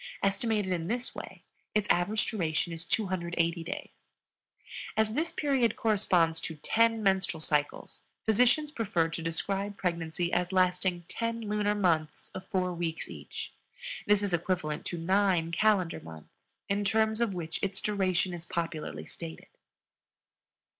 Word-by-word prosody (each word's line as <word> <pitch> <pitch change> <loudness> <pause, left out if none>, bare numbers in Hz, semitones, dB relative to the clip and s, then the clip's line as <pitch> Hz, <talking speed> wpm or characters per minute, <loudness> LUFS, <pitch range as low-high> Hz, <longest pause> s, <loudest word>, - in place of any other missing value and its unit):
Estimated 200 -1 +2
in 170 -2 -2
this 240 +4 -2
way - - -9 0.3
its 210 -1 +2
average 205 +5 +2
duration 170 -4 -1
is 165 +1 -4
280 170 -4 0
days. 165 - -5 1.1
As 220 0 +3
this 320 +6 0
period 265 -6 +2
corresponds 180 -7 +2
to 160 - -5
ten 225 +8 +2
menstrual 190 -4 +2
cycles, 150 -2 -1 0.2
physicians 250 +7 +4
prefer 190 - +1
to 165 - -4
describe 195 +5 -2
pregnancy 170 -1 -1
as 180 +1 +1
lasting 180 -1 +2
10 230 0 -2
lunar 210 -1 0
months 160 -7 0
of 190 0 -7
four 185 -2 0
weeks 165 -2 -3
each. 75 -3 -7 0.5
This 205 0 +4
is 200 -3 -1
equivalent 170 -3 -1
to 175 - -3
9 180 -1 +2
calendar 185 -1 +2
months, 80 -1 -11 0.4
in 200 +1 +1
terms 220 +2 +2
of 220 -5 +1
which 165 -2 -4
its 195 0 -1
duration 190 -3 +1
is 170 -1 -5
popularly 155 - -3
stated. 80 0 -8
185 Hz, 140 wpm, -30 LUFS, 165-210 Hz, 1.1 s, physicians